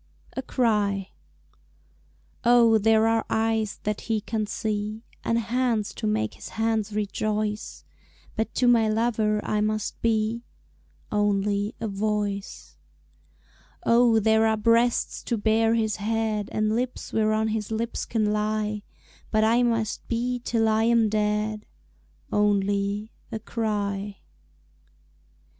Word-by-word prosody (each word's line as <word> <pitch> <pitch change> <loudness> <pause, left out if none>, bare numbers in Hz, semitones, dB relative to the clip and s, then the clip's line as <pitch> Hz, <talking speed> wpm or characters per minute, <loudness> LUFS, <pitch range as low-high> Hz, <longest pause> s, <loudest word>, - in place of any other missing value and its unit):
A 265 - -2
Cry 210 -7 0 1.3
Oh, 235 -2 +5
there 220 +1 +4
are 225 0 +2
eyes 220 -2 0
that 210 0 -2
he 225 -1 -1
can 215 0 -3
see, 215 +1 -3 0.2
And 230 - +1
hands 235 -2 0
to - - -3
make 110 0 0
his - - -10
hands 220 -1 -1
rejoice, 210 0 -2 0.5
But 220 - -2
to 250 - +2
my 230 -2 +4
lover 215 -1 +1
I 210 - 0
must 215 0 -2
be 225 +1 0 0.7
Only 205 0 0
a 225 - -2
voice. 205 0 -3 1.1
Oh, 230 -1 +5
there 220 +1 +3
are 220 0 +2
breasts 230 +2 +2
to 235 - -1
bear 225 +1 +2
his 220 -2 0
head, 215 0 -1
And 215 0 0
lips 250 +1 -3
whereon 220 0 +2
his 215 -1 -2
lips 225 +1 -2
can 215 -2 +1
lie, 210 0 -1 0.5
But 215 0 +2
I 230 +3 +4
must 230 -3 -1
be 245 +1 -1
till 225 -2 +1
I 220 0 +2
am 230 -2 +3
dead 210 0 -1 0.7
Only 205 0 +1 0.2
a - - -2
cry. 205 -3 -3
215 Hz, 125 wpm, -25 LUFS, 210-225 Hz, 1.3 s, Oh